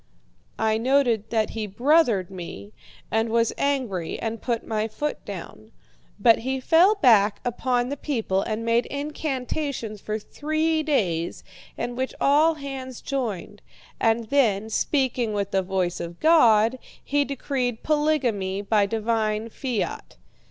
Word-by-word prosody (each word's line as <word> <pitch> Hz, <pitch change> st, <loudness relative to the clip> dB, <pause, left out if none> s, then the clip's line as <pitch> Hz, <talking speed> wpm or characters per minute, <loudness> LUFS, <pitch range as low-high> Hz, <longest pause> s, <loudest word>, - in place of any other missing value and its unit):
"I 220 Hz, 0 st, +1 dB
noted 240 Hz, -4 st, +2 dB
that 220 Hz, -2 st, 0 dB
he 220 Hz, -2 st, -4 dB
'brothered' 235 Hz, -, +2 dB
me, 140 Hz, -, -8 dB, 0.4 s
and 225 Hz, +1 st, +1 dB
was 230 Hz, 0 st, +2 dB
angry 250 Hz, -12 st, -1 dB
and 225 Hz, 0 st, -4 dB
put 235 Hz, -2 st, -2 dB
my 215 Hz, 0 st, -1 dB
foot 295 Hz, +7 st, -4 dB
down. -, -, -8 dB, 0.5 s
But 230 Hz, -2 st, +5 dB
he 265 Hz, +3 st, -2 dB
fell 340 Hz, +10 st, +5 dB
back 215 Hz, -, +4 dB
upon 245 Hz, 0 st, 0 dB
the 285 Hz, -, -3 dB
people 225 Hz, -10 st, -1 dB
and 220 Hz, +2 st, -3 dB
made 230 Hz, +1 st, +2 dB
incantations 280 Hz, -5 st, -4 dB
for 215 Hz, 0 st, -3 dB
three 310 Hz, +7 st, -1 dB
days, 180 Hz, -, -1 dB, 0.3 s
in 240 Hz, +1 st, -3 dB
which 260 Hz, +1 st, -3 dB
all 305 Hz, +4 st, +4 dB
hands 270 Hz, -3 st, -7 dB
joined; 220 Hz, -7 st, -4 dB, 0.4 s
and 225 Hz, +1 st, +2 dB
then, 220 Hz, -6 st, +2 dB
speaking 250 Hz, -3 st, 0 dB
with 200 Hz, -1 st, -2 dB
the 195 Hz, -, +2 dB
voice 185 Hz, -1 st, -1 dB
of 170 Hz, 0 st, -7 dB
God, 245 Hz, -7 st, +5 dB, 0.2 s
he 285 Hz, +1 st, +1 dB
decreed 260 Hz, -4 st, -3 dB
polygamy 250 Hz, -11 st, 0 dB
by 205 Hz, -1 st, +2 dB
divine 220 Hz, 0 st, -1 dB
fiat. 245 Hz, -1 st, -4 dB
230 Hz, 135 wpm, -24 LUFS, 215-280 Hz, 0.5 s, But